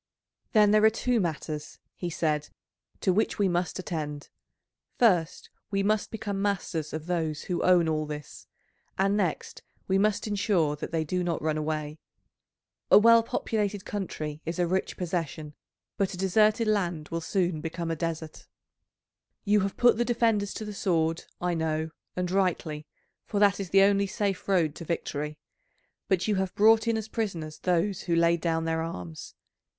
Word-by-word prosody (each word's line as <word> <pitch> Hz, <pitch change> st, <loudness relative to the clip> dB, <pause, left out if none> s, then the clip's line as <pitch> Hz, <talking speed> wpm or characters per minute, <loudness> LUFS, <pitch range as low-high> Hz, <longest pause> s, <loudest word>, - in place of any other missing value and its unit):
"Then 210 Hz, -2 st, +6 dB
there 215 Hz, 0 st, +4 dB
are 220 Hz, -, +8 dB
two 240 Hz, +2 st, 0 dB
matters," 155 Hz, -4 st, -4 dB, 0.2 s
he 175 Hz, -, -4 dB
said, 150 Hz, -3 st, -1 dB, 0.5 s
"to 185 Hz, -, +2 dB
which 215 Hz, +4 st, +1 dB
we 200 Hz, -, +3 dB
must 175 Hz, 0 st, -1 dB
attend; 150 Hz, -5 st, -5 dB, 0.7 s
first 180 Hz, -9 st, +2 dB, 0.2 s
we 195 Hz, -1 st, 0 dB
must 210 Hz, +1 st, +1 dB
become 205 Hz, -3 st, -4 dB
masters 185 Hz, -6 st, -2 dB
of 155 Hz, 0 st, -5 dB
those 160 Hz, -4 st, -2 dB
who 180 Hz, -, -2 dB
own 180 Hz, -2 st, +4 dB
all 155 Hz, -1 st, -1 dB
this, 150 Hz, -2 st, -8 dB, 0.5 s
and 195 Hz, +1 st, +2 dB
next 185 Hz, -6 st, -2 dB, 0.3 s
we 190 Hz, 0 st, +2 dB
must 210 Hz, 0 st, +1 dB
ensure 195 Hz, -7 st, +1 dB
that 150 Hz, -, -6 dB
they 165 Hz, -1 st, 0 dB
do 180 Hz, +4 st, -1 dB
not 170 Hz, -2 st, -1 dB
run 155 Hz, -1 st, +1 dB
away. 155 Hz, 0 st, -3 dB, 0.9 s
A -, -, +9 dB
well 230 Hz, +2 st, +7 dB
populated 210 Hz, -3 st, -2 dB
country 155 Hz, -7 st, -4 dB
is 165 Hz, +2 st, -4 dB
a 175 Hz, -, +2 dB
rich 185 Hz, +2 st, -1 dB
possession, 165 Hz, -4 st, -3 dB, 0.4 s
but 195 Hz, -1 st, 0 dB
a -, -, -10 dB
deserted 215 Hz, +4 st, +3 dB
land 175 Hz, -7 st, 0 dB
will 165 Hz, 0 st, -3 dB
soon 175 Hz, -3 st, 0 dB
become 165 Hz, +1 st, -4 dB
a -, -, -1 dB
desert. 160 Hz, -1 st, -5 dB, 1.0 s
You 210 Hz, 0 st, +3 dB
have 195 Hz, 0 st, -2 dB
put 245 Hz, -2 st, +5 dB
the -, -, +4 dB
defenders 225 Hz, -4 st, +1 dB
to 215 Hz, -, -5 dB
the 210 Hz, -, -6 dB
sword, 165 Hz, -4 st, 0 dB
I 180 Hz, 0 st, 0 dB
know, 160 Hz, -1 st, -1 dB, 0.2 s
and 180 Hz, -1 st, -2 dB
rightly 165 Hz, -5 st, -1 dB, 0.4 s
for 205 Hz, -, -1 dB
that 205 Hz, -1 st, +4 dB
is 195 Hz, -3 st, -4 dB
the 195 Hz, +2 st, +6 dB
only 200 Hz, 0 st, +3 dB
safe 200 Hz, -1 st, -2 dB
road 170 Hz, -6 st, +2 dB
to -, -, -7 dB
victory; 150 Hz, -2 st, -3 dB, 0.7 s
but 190 Hz, 0 st, +1 dB
you 210 Hz, -2 st, +1 dB
have 190 Hz, -1 st, -2 dB
brought 225 Hz, +2 st, +5 dB
in 230 Hz, -1 st, +2 dB
as 220 Hz, -1 st, -4 dB
prisoners 170 Hz, -10 st, -4 dB
those 180 Hz, +2 st, 0 dB
who 170 Hz, -2 st, 0 dB
laid 170 Hz, 0 st, +3 dB
down 165 Hz, -1 st, 0 dB
their 160 Hz, 0 st, 0 dB
arms. 90 Hz, -, -7 dB
180 Hz, 170 wpm, -28 LUFS, 160-205 Hz, 1.0 s, A